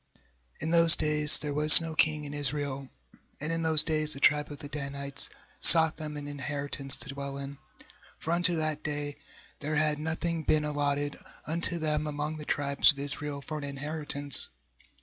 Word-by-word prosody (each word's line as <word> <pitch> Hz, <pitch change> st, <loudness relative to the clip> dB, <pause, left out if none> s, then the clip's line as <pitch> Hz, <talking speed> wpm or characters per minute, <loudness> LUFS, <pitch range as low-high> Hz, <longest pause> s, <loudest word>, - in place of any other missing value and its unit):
"| -, -, -47 dB
Q -, -, -33 dB, 0.5 s
In 160 Hz, -, -3 dB
those 165 Hz, -1 st, +7 dB
days 150 Hz, -1 st, +5 dB
there 145 Hz, -1 st, -5 dB
was 150 Hz, +1 st, +8 dB
no 165 Hz, -1 st, -6 dB
king 155 Hz, -1 st, 0 dB
xu -, -, -7 dB
in 145 Hz, -, -8 dB
Israel; 140 Hz, -1 st, -2 dB, 0.5 s
and 150 Hz, +3 st, -4 dB
in 165 Hz, 0 st, -2 dB
those 160 Hz, -2 st, +4 dB
days 155 Hz, -1 st, -2 dB
the 140 Hz, -, -9 dB
tribe 150 Hz, +1 st, +1 dB
of 145 Hz, -, -9 dB
the 145 Hz, -, -10 dB
Danites 140 Hz, -1 st, -1 dB, 0.3 s
sought 160 Hz, -2 st, +5 dB
them 150 Hz, -1 st, -7 dB
an 145 Hz, 0 st, -8 dB
inheritance 140 Hz, -1 st, -1 dB
to 135 Hz, -, -11 dB
dwell 140 Hz, 0 st, -7 dB
in; 140 Hz, 0 st, -9 dB, 0.6 s
for 160 Hz, -, -6 dB
unto 175 Hz, 0 st, +4 dB
that 155 Hz, -1 st, -3 dB
day 145 Hz, -1 st, -5 dB, 0.4 s
there 150 Hz, +1 st, -4 dB
had 150 Hz, 0 st, 0 dB
nothing 160 Hz, +1 st, -4 dB
been 155 Hz, 0 st, 0 dB
allotted 145 Hz, -1 st, -3 dB, 0.3 s
unto 170 Hz, +2 st, +1 dB
them 155 Hz, -1 st, -2 dB
among 150 Hz, +1 st, -5 dB
the 150 Hz, -, -9 dB
tribes 140 Hz, -1 st, +2 dB
of 145 Hz, -, -14 dB
Israel 140 Hz, 0 st, -5 dB
for 155 Hz, +1 st, -7 dB
an -, -, -9 dB
inheritance. 145 Hz, 0 st, -1 dB
150 Hz, 190 wpm, -27 LUFS, 145-155 Hz, 0.6 s, was